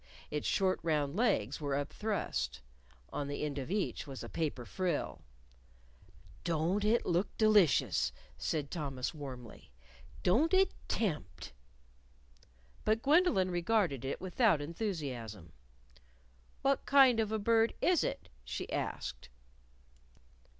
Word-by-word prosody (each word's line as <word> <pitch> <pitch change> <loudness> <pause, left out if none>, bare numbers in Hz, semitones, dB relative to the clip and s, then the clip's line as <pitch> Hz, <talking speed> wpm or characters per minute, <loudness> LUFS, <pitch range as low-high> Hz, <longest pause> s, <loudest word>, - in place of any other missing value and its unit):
Its 150 -1 -2
short 190 -1 +2
round 150 -3 0
legs 155 - +1
were 140 -2 -1
up 145 +1 -3
thrust. 215 -2 -2 0.5
On 145 - -2
the 145 +1 -3
end 145 -2 -2
of 135 - -5
each 200 -4 -2
was 135 -2 -7
a - - -7
paper 150 -7 -2
frill. 175 - -2 1.2
"Don't 170 +4 0
it 220 +3 +2
look 175 +3 0
delicious!" 185 - +4 0.2
said 145 -3 -2
Thomas 135 -6 -3
warmly. 130 -6 -9 0.5
"Don't 285 - +4
it 380 0 +4 0.2
tempt!" 180 - -2 1.3
But 220 +1 +1
Gwendolyn 285 - +4
regarded 175 - +1
it 135 - -3
without 190 - +2
enthusiasm. 140 - -5 1.1
"What 275 0 +1
kind 265 -4 +6
of 220 -1 0
a 220 - +1
bird 225 +2 +3
is 355 -3 +3
it?" - - -3 0.2
she - - -5
asked. 60 - -4
170 Hz, 120 wpm, -33 LUFS, 140-220 Hz, 1.3 s, kind